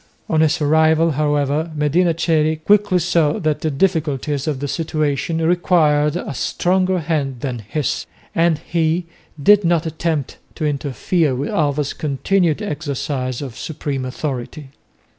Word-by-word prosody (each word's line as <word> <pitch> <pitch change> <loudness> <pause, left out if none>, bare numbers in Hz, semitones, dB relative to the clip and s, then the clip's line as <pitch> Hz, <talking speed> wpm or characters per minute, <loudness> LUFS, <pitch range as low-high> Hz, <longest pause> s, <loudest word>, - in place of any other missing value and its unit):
On 160 -1 +2
his 155 -1 +2
arrival, 160 +2 +3
however, 150 +1 0
Medina 160 +3 +2
Coeli 160 -1 +2
quickly 205 +4 +3
saw 165 -3 +2
that 155 -7 -1
the 160 - 0
difficulties 150 -3 0
of 145 -4 -1
the 145 - -3
situation 155 0 -1
required 160 -3 +2
a 175 -3 -4
stronger 185 +7 +1
hand 145 -6 -2
than 125 -4 -3
his, 135 +7 -3 0.3
and 165 -1 +2
he 165 +2 -1 0.3
did 205 +7 +5
not 170 -1 +2
attempt 160 -2 -2 0.2
to 155 - -3
interfere 145 +1 0
with 140 +4 -3
Alva's 145 -2 0
continued 165 +5 0
exercise 140 - -3
of 130 -4 -7
supreme 140 -2 -4
authority. 135 +1 -5
155 Hz, 135 wpm, -19 LUFS, 145-165 Hz, 0.3 s, did